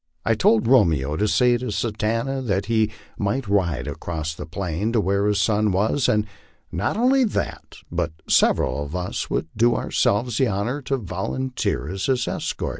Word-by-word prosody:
I 115 - +3
told 110 +1 +3
Romeo 80 - +3
to 105 +6 +1
say 125 +2 +3
to 125 -2 -4
Satanta 115 +5 -1
that 100 -6 -1
he 110 -1 +2 0.3
might 105 +4 -1
ride 90 -8 +1
across 80 -2 -4
the 75 -1 -8
plain 90 +4 -2
to 115 - +3
where 100 0 +1
his 105 -1 +2
son 105 +1 +2
was, 110 +8 +1
and 105 0 +2 0.5
not - - -1
only 260 +3 +4
that, 220 - -3 0.2
but 85 -2 -1 0.2
sev* - - +4
eral 65 +2 -1
of 75 +4 -7
us 90 0 -3
would 80 - -2
do 120 +2 +3
ourselves 110 +3 0
the 130 - +4
honor 115 +8 -2
to 135 0 -1
volunteer 115 - -3
as 95 +3 -3
his 130 -3 +1
escort. - - -3
105 Hz, 180 wpm, -23 LUFS, 90-120 Hz, 0.5 s, only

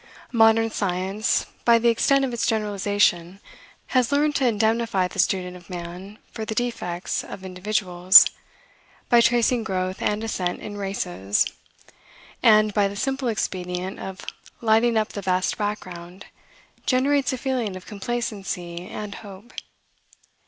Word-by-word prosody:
Modern 225 -1 +4
science, 195 +3 -1 0.2
by 235 -1 +6
the 235 +1 +3
extent 275 +4 +3
of 250 - -4
its 235 - -1
generalization, 205 -4 0 0.5
has 255 -1 +2
learned 295 +1 +2
to 265 - +2
indemnify 225 -3 +1
the 195 - -9
student 180 -1 0
of 175 -2 -14
man 180 +3 -8
for 220 - -6
the 220 0 -4
defects 205 -8 -2
of 190 - -9
individuals, 185 -1 +5 0.8
by 240 -1 +6
tracing 240 0 +2
growth 185 -2 -3
and 210 +1 -1
ascent 185 -5 -2
in 205 - -7
races; 105 - -1 1.0
and, 215 -1 +5
by 200 0 +3
the 200 - -7
simple 270 +4 -2
expedient 185 -3 -3
of 190 0 -8 0.3
lighting 225 +1 +3
up 215 -1 +1
the 200 - -6
vast 185 -1 0
background, 185 -3 -5 0.6
generates 270 +1 +2
a 260 - -3
feeling 245 -6 -2
of 185 - -10
complacency 195 -5 -4
and 210 -1 -6
hope. 205 +3 -12
205 Hz, 135 wpm, -23 LUFS, 185-230 Hz, 1.0 s, by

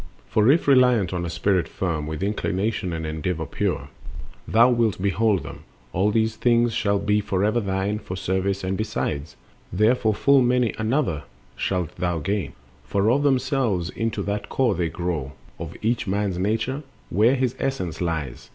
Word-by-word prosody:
For 110 - +3
if 160 +1 +2
reliant 125 -9 +4
on 85 -1 -2
a - - -4
spirit 85 0 +1
firm, 80 -6 -3
With 80 +1 -4
inclination 100 -1 -1
and 80 -1 -3
endeavor 80 +2 -2
pure, - - -2 0.6
Thou 120 +3 +5
wilt 115 -6 +1
behold 100 0 +1
them, - - -8 0.3
all 95 +4 +2
these 110 0 +1
things 120 -1 +2
shall 100 -2 +1
be 105 +1 +1
Forever 105 +3 +1
thine, 100 0 -1
for 90 - -6
service, 95 +1 -1
and 95 +1 -1
besides 85 -8 -3 0.4
Thereof 110 +2 +2
full 140 -1 +5
many 125 -2 +2
another 110 - 0 0.3
shalt 90 -4 -2
thou 85 -1 -1
gain; 95 +1 -2 0.3
For 100 +3 +1
of 140 +3 +2
themselves 130 - +1
into 115 -1 -2
that 100 0 -3
core 130 -5 +2
they 85 -2 -1
grow 80 -6 -3 0.3
Of - - -7
each 115 0 0
man's 100 -2 -1
nature, 110 +8 -1 0.3
where 110 +8 +4
his 130 -1 0
essence 95 -13 -2
lies. 80 -7 -3
100 Hz, 160 wpm, -24 LUFS, 90-115 Hz, 0.6 s, Thou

